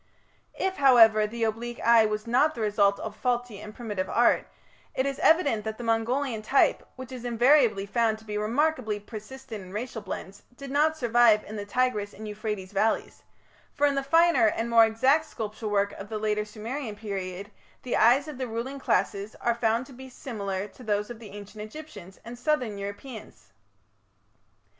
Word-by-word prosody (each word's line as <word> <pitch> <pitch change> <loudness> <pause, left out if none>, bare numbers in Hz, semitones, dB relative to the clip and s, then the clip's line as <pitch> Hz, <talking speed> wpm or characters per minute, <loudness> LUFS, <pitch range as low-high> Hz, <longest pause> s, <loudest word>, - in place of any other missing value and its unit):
If, 380 0 -1
however, 225 -6 +6
the 230 +2 -4
oblique 230 +2 -3
eye 230 -1 +5
was 215 0 -3
not 260 +7 +2
the 230 - -5
result 205 -2 +2
of 220 -1 -6
faulty 245 -2 -2
and 210 - -8
primitive 210 -5 -4
art, 240 - +3 0.5
it 260 - +1
is 275 0 -3
evident 285 -10 +3
that 220 0 -4
the 240 - -7
Mongolian 230 +1 0
type, 265 +6 +3
which 260 0 -9
is 250 -2 -7
invariably 240 -3 +3
found 220 +1 +1
to 220 - -18
be 210 -1 -5
remarkably 225 0 0
persistent 220 +2 -9
in 185 - -12
racial 225 +2 -5
blends, 195 0 -7 0.2
did 275 -1 -8
not 310 +3 +2
survive 235 -4 +4
in 215 - -9
the 205 -1 -6
Tigris 215 -3 0
and 215 +1 -8
Euphrates 210 -2 -5
valleys, 215 +2 0 0.5
for 290 - +2
in 285 - +3
the 275 - 0
finer 330 -2 +4
and 230 +2 -1
more 230 -1 +7
exact 265 +8 +2
sculpture 215 0 -6
work 200 -1 +1
of 200 +1 -9
the 220 - -3
later 210 0 -1
Sumerian 220 +3 -6
period 200 -1 -6 0.3
the 250 - -2
eyes 255 +6 +4
of 295 -4 -8
the 255 - -2
ruling 240 +5 -5
classes 200 -5 -1
are 235 - +1
found 230 +1 0
to 270 - -14
be 260 +1 -11
similar 200 -6 -5
to 255 - -17
those 210 0 -1
of 235 - -9
the 220 -3 -11
Ancient 205 +1 -10
Egyptians 215 - -11
and 240 +1 -9
southern 250 -7 -1
Europeans. 210 +3 -9
225 Hz, 180 wpm, -27 LUFS, 210-255 Hz, 0.5 s, more